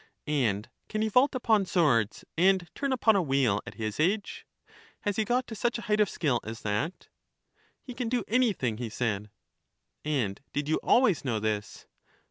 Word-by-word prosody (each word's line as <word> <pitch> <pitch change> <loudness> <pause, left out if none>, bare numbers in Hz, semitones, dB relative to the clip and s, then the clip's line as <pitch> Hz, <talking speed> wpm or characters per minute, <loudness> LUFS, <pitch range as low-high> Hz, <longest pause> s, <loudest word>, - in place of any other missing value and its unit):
And 115 -9 0 0.2
can 215 0 -1
he 220 - 0
vault 255 +6 +4
upon 220 -6 +2
swords, 120 - +2
and 185 0 +3
turn 275 -1 -2
upon 225 -4 +3
a 195 - +3
wheel, 135 - +1
at - - -8
his 110 +1 -4
age? 195 +6 0 0.5
has 205 -2 -2
he 220 - +2
got 250 +3 +1
to 235 - -8
such 240 +3 -1
a 230 - -7
height 210 0 +1
of 210 -3 +4
skill 140 -8 0
as 110 +1 -7
that? 105 - -2 0.8
He 250 - -8
can 240 -1 -3
do 245 -2 0
anything, 210 - +1
he 120 -2 -3
said. 105 -2 -2 0.7
And 130 -10 -1
did 145 0 -2
you 155 - +1
always 240 - +3
know 120 -5 -1
this? 105 -1 -3
165 Hz, 180 wpm, -28 LUFS, -, 0.8 s, vault